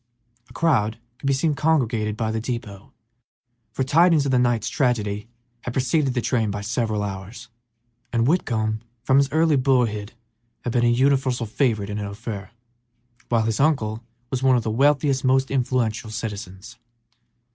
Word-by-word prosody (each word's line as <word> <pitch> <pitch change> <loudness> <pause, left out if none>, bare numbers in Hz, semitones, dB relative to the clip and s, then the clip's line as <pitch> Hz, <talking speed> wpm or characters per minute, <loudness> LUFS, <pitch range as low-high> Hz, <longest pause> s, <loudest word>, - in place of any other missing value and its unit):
A - - -15
crowd 115 -10 +1 0.2
could - - -4
be 140 - +3
seen 150 +3 +1
congregated 125 -9 +1
about 110 0 -2
the 110 - -1
depot, 110 -4 -6 0.8
for 130 - -1
tidings 160 +2 +4
of 135 - 0
the 125 - +3
night's 120 -2 +1
tragedy 110 -5 -1 0.3
had 125 - -5
preceded 135 +1 +1
the 125 - +1
train 115 -3 0
by 100 0 -4
several 110 -1 -1
hours, 105 +4 -7 0.6
and 115 -1 +1
Whitcomb 110 -8 0 0.2
from 130 +2 +3
his 140 0 +3
early 160 -1 +3
boyhood 120 -5 +1 0.5
had 120 - -3
been 120 -1 +2
a - - +4
universal 130 0 +2
favorite 110 -3 0
in 105 - -3
Ophir, 100 -1 -6 0.8
while 115 -2 +2
his 110 -1 -1
uncle 120 -7 +1 0.3
was 130 -1 -1
one 130 -1 +4
of 120 - +2
its 110 - -1
wealthiest, 140 +1 +2
most 130 0 +2
influential 125 -4 0
citizens. 110 0 -7
120 Hz, 155 wpm, -23 LUFS, 110-135 Hz, 0.8 s, tidings